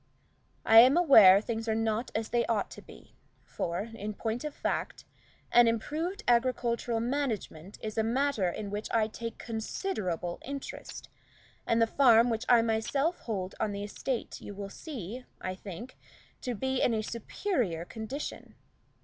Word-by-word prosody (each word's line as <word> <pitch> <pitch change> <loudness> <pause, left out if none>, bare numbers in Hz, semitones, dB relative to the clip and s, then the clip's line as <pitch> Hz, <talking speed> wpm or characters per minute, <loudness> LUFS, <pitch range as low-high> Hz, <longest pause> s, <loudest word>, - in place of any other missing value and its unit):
I 225 0 +9
am 255 +7 +7
aware 220 - +8
things 225 0 -4
are 220 - +2
not 225 +1 -1
as 220 0 -2
they 240 -1 +2
ought 220 -3 0
to - - -10
be, - - -16 0.3
for, 170 +1 -3
in 215 -1 -5
point 225 +4 -3
of 300 - -3
fact, - - -3 0.5
improved 295 - +2
agricultural 235 -1 +1
management 225 - -3
is 215 0 -3
a - - +3
matter 235 -4 +1
in 200 +3 -5
which 210 +1 -4
I 220 -2 +2
take 230 +1 -6
considerable 215 - -3
interest, 280 0 -7 0.6
and 230 - +2
the 230 - +5
farm 235 -1 +5
which 225 +2 -2
I 235 -2 +6
myself 250 +9 0
hold 195 -5 -4
on 210 -2 -1
the 200 0 -4
estate 235 +4 -4
you 205 - -8
will 200 0 -6
see, 250 - -7 0.2
I 185 - -4
think, 195 +6 -9 0.4
to 250 -2 -3
be 265 +4 -1
in 230 - +3
a 215 - -1
superior 230 - -2
condition. 225 +9 -6
225 Hz, 155 wpm, -30 LUFS, 210-255 Hz, 0.6 s, I